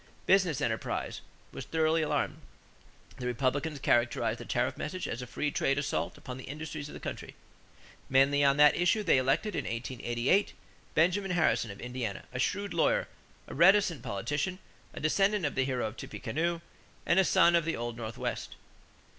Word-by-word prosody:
Business 180 -7 +3
enterprise 110 -3 -2 0.3
was - - -7
thoroughly 160 0 +1
alarmed. 155 - -1 0.8
The 125 - -4
Republicans 140 +5 -1
characterized 120 -3 +1
the - - -8
tariff - - 0
message 185 +5 -4
as 120 - -4
a 125 - -7
free 150 +5 -2
trade 135 0 +1
assault 145 0 -2
upon 125 0 -8
the 130 - -9
industries 150 0 -6
of - - -10
the - - -8
country. - - -7 0.7
Mainly 135 +2 +4
on 140 0 +4
that 150 0 +7
issue 180 +5 +2
they 165 -8 +4
elected 135 +11 0
in - - -2
1888 120 - 0 0.4
Benjamin 180 +5 +2
Harrison 170 -10 +2
of 100 - -9
Indiana, 125 -5 -4
a 125 - -4
shrewd 200 +8 -1
lawyer, 170 - +2 0.4
a - - -8
reticent 175 - +4
politician, 145 - -2 0.3
a - - -8
descendant 195 +4 +2
of 145 - -1
the 130 - +1
hero 130 -3 -1
of 110 +2 -5
Tippecanoe, 170 +3 -3 0.4
and 190 - +4
a - - +6
son 175 -1 +4
of 170 - +3
the 165 +1 -2
old 120 0 -4
Northwest. 115 -1 -5
145 Hz, 170 wpm, -30 LUFS, 125-170 Hz, 0.8 s, that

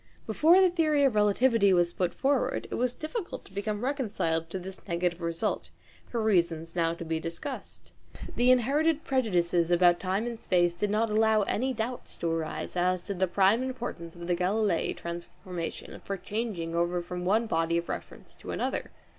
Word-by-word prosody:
Before 320 - +5
the 375 -1 +6
theory 310 -4 +2
of 270 -4 +4
relativity 210 0 +4
was 175 -1 +2
put 180 -1 0
forward, 275 0 0
it - - -3
was 250 0 0
difficult 345 +5 -5
to - - -17
become 205 +2 -3
reconciled 200 - -1
to 190 - -4
this 190 +2 -9
negative 175 0 -1
result, 170 0 -2 0.4
for 230 -2 -2
reasons 170 -5 +1
now 165 -1 +1
to 170 - -7
be 160 0 -1
discussed. 170 - -6 0.4
The 245 +1 +3
inherited 290 +6 +3
prejudices 180 -10 +1
about 175 0 +5
time 195 +4 -1
and 235 -1 -5
space 175 -2 +2
did 200 +4 -1
not 215 +1 +1
allow 220 0 +4
any 255 +6 0
doubt 240 +1 -4
to 170 - -3
arise 165 +1 -3
as 180 0 +1
to 200 - -3
the 190 0 +1
prime 195 +6 +3
importance 245 -10 -5
of 170 0 -8
the 175 0 +1
Galileian 190 +1 0
transformation 170 0 -6
for 195 - -3
changing 195 -4 -3
over 175 +1 0
from 180 +1 -5
one 215 +6 +2
body 165 -4 +1
of 170 - -2
reference - - -7
to - - -10
another. - - -2
195 Hz, 180 wpm, -28 LUFS, 170-235 Hz, 0.4 s, the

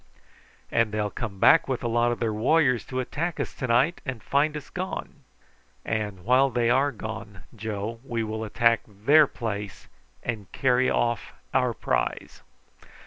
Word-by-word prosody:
"And 115 -2 +2
they'll 105 -1 -1
come 110 -5 -5
back 165 - +6
with 130 -2 -2
a - - 0
lot 120 +1 +2
of 120 - -3
their 115 -2 0
warriors 125 +2 +3
to 130 - -4
attack 155 +6 -3
us - - -3
to 130 - -4
night 130 +8 +2
and 125 -5 -5
find 150 +2 +1
us 145 - -10
gone!" 185 +1 -5 0.7
"And 105 -4 -3
while 130 +3 +4
they 120 -1 +1
are 135 +3 +3
gone, 110 -4 -8
Joe, 110 +1 -4
we 120 -4 -2
will 110 0 -4
attack 115 +2 +2
their 140 +9 +4
place 105 -6 -5 0.4
and 110 -5 -4
carry 130 -1 +2
off 120 -1 0 0.2
our - - +2
prize!" - - -2
120 Hz, 160 wpm, -26 LUFS, 110-130 Hz, 0.7 s, back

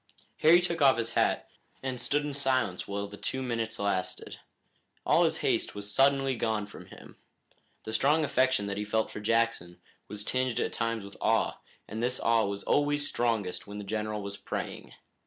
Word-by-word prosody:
Harry 165 +3 +7
took 170 -2 -1
off 135 -3 +6
his 115 -1 -2
hat - - +1 0.4
and 130 -2 -3
stood 145 +4 0
in 145 - -3
silence 130 -9 0
while 100 0 -3
the 105 0 -11
two 130 +6 -3
minutes 115 -2 -2
lasted. 100 -3 -2 0.7
All - - +5
his - - +1
haste - - +1
was 100 0 -4
suddenly 135 -1 +3
gone 110 -3 -1
from 100 - -12
him. - - -14 0.7
The 110 - -6
strong 145 +7 +3
affection 130 -6 +2
that 100 0 -3
he 105 - -1
felt 110 +1 0
for - - -6
Jackson 115 -5 0 0.3
was 105 -1 -6
tinged 130 +1 0
at - - -1
times 115 -2 -1
with 100 - -12
awe, - - +1 0.3
and 110 - -5
this 125 +1 +1
awe 115 -1 +3
was 100 0 -4
always 145 0 +2
strongest 110 -7 -1
when 100 0 -7
the 105 - -5
general 105 0 -3
was 100 0 -5
praying. - - -5
115 Hz, 185 wpm, -29 LUFS, 105-130 Hz, 0.7 s, Harry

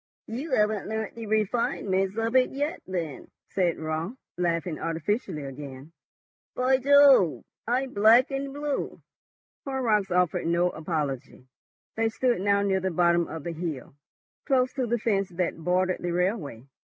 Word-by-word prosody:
"You 260 +6 -5
haven't 210 -1 +1
learnt 220 -1 -3
the 230 -1 -7
refinements 205 -2 0
of 225 +2 -1
it 255 -1 +5
yet 290 +5 -3
then," 165 -7 -4 0.2
said 180 -4 +1
Raut, 160 +7 -3 0.2
laughing 170 -2 -1
artificially 165 - -2
again. 135 +1 -9 0.6
"By 255 +1 +3
Jove! 275 - +5 0.2
I'm 255 +2 0
black 225 +6 +5
and 275 0 -3
blue." 290 0 -4 0.6
Horrocks 230 -8 0
offered 180 -1 +1
no 175 +1 +2
apology. 150 -6 -4 0.5
They 225 0 +1
stood 240 -2 0
now 200 0 +2
near 195 -1 +1
the 190 0 -1
bottom 170 -1 +2
of 160 -2 -7
the 170 - -4
hill, 160 -7 -5 0.5
close 255 -3 +2
to 260 -2 -1
the 240 +1 +1
fence 200 -4 0
that 175 -1 -2
bordered 180 +2 0
the 175 - -2
railway. 175 - -1
195 Hz, 145 wpm, -27 LUFS, 170-240 Hz, 0.6 s, it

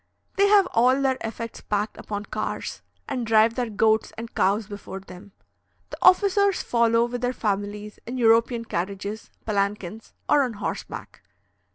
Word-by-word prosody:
They 400 +1 +4
have 400 -1 +6
all 255 +3 +4
their 265 -1 +1
effects 225 +1 -6
packed 210 +1 -2
upon 205 0 -5
cars, - - -4 0.3
and 255 -3 -2
drive 225 0 +4
their 245 -1 -2
goats 220 +1 +2
and 230 +1 -7
cows 205 +3 +2
before 200 -1 -8
them. 195 +1 -13 0.6
The - - -6
officers 400 +1 +4
follow, 235 0 +3
with 240 0 -5
their 250 0 0
families, 205 -1 -3
in 250 +2 -4
European 230 0 +3
carriages, 200 +3 -4 0.2
palanquins, 205 0 -2
or 295 - +5
on 250 -4 -1
horseback. 205 - -6
225 Hz, 150 wpm, -25 LUFS, 205-245 Hz, 0.6 s, have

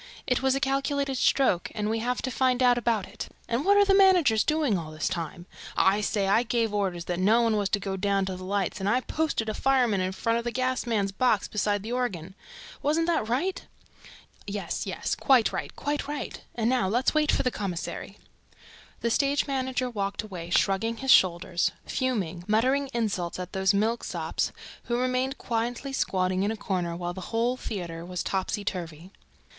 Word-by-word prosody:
It 250 -2 +1
was 265 0 +2
a - - 0
calculated 275 0 0
stroke 255 -13 +2
and 210 -1 -1
we 225 +1 0
have 245 +2 -2
to 260 - -2
find 255 0 +2
out 245 -1 +6
about 230 -4 0
it... 205 - -7 0.2
And 235 +4 0
what 405 +3 +5
are 405 - +6
the 390 - +4
managers 360 - +5
doing 305 -8 +1
all 165 -4 -4
this 155 0 -3
time?... 170 0 -4 0.3
I 195 +2 +4 0.4
gave 230 -2 0
orders 185 -4 -1
that 175 0 -2
no 220 +5 +4
one 225 -2 +2
was 205 -2 0
to 205 - +1
go 195 -1 -3
down 195 0 +1
to 190 -1 -4
the 185 - -8
lights 195 0 -1
and 195 +1 0
I 250 +4 +2
posted 305 -6 -1
a 215 - -1
fireman 245 -6 +2
in 185 0 -1
front 230 +4 0
of - - -5
the 240 - -1
gas 255 0 -1
man's 205 -4 0
box 220 +1 +1
beside 205 -1 0
the 225 - -5
organ. 195 -9 -2 0.5
Wasn't 310 +3 +1
that 320 -10 0
right?" 320 +11 -1 0.8
"Yes, 200 -1 -3
yes, - - -2
quite 260 -5 +3
right, - - -4
quite 290 -1 -2
right. 295 -1 -5
And 225 -1 0
now 250 -5 +2
let's 240 +6 +1
wait 310 0 +3
for - - +1
the 255 - +1
commissary." 190 -6 -5 0.8
The 235 - 0
stage 280 +3 +2
manager 260 -2 -1
walked 200 -4 -3
away, 180 -5 -7
shrugging 200 +6 +1
his 265 +1 +1
shoulders, 175 -1 +4 0.2
fuming, 195 -10 -2
muttering 260 +6 +2
insults 200 -8 -2
at 180 0 -6
those 190 +1 +3
milksops 225 +4 -1 0.3
who 240 - 0
remained 255 +2 0
quietly 240 +3 -3
squatting 185 -6 0
in 200 - +1
a 220 - -3
corner 180 -4 -2
while 175 0 -4
the 190 - -7
whole 235 +2 +1
theater 175 -9 -5
was 180 0 -4
topsyturvy. 185 -3 -3
225 Hz, 190 wpm, -27 LUFS, 190-255 Hz, 0.8 s, out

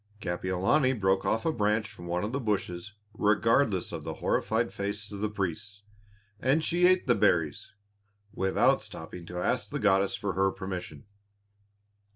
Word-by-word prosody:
Kapiolani 95 - +1
broke 95 -1 +2
off 110 - 0
a 165 - +3
branch 105 -3 +1
from 85 - -11
one 90 +2 -1
of 105 - -2
the 140 - -1
bushes 105 -4 -2 0.2
regardless 110 -1 +2
of - - -5
the - - -5
horrified 115 +1 0
faces 100 +1 -4
of 100 - -6
the 105 +1 -1
priests. 100 +1 -4 0.6
And 140 +5 +2
she 175 +2 +4
ate 185 0 +3
the 125 - +4
berries, 80 -4 +1 0.6
without 95 0 +2
stopping 85 +1 -8
to 90 - -7
ask 125 +8 0
the 145 - -3
goddess 100 -4 +2
for 100 -2 -3
her 95 +2 +2
permission. 95 +2 -6
100 Hz, 160 wpm, -29 LUFS, 95-115 Hz, 0.6 s, she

